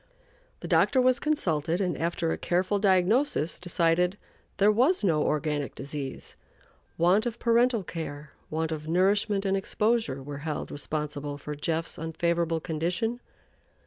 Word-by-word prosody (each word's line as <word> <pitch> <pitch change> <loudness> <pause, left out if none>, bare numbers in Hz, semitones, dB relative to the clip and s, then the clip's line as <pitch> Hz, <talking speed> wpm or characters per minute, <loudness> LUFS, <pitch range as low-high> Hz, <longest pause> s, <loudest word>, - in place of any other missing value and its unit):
The - - -5
doctor 265 - +3
was 255 +1 +4
consulted, 170 - 0
and 180 -4 0
after 165 0 -1
a - - -1
careful 185 +3 0
diagnosis, 195 - +2
decided 175 +1 +1 0.4
there 205 +2 +5
was 255 - +3
no 160 -6 +2
organic 150 -2 -1
disease: 140 -1 -6 0.6
want 185 +7 +3
of 235 -1 -4
parental 235 -2 +2
care, 155 -3 -6 0.2
want 160 +1 -2
of 155 -1 -5
nourishment 195 +4 +2
and 195 0 +2
exposure, 210 - 0
were 145 0 -6
held 150 0 -4
responsible 145 -1 -4
for 150 +1 -6
"Jeff's" 160 +3 -2
unfavorable 165 0 0
condition. 180 +9 -2
170 Hz, 135 wpm, -27 LUFS, 155-205 Hz, 0.6 s, there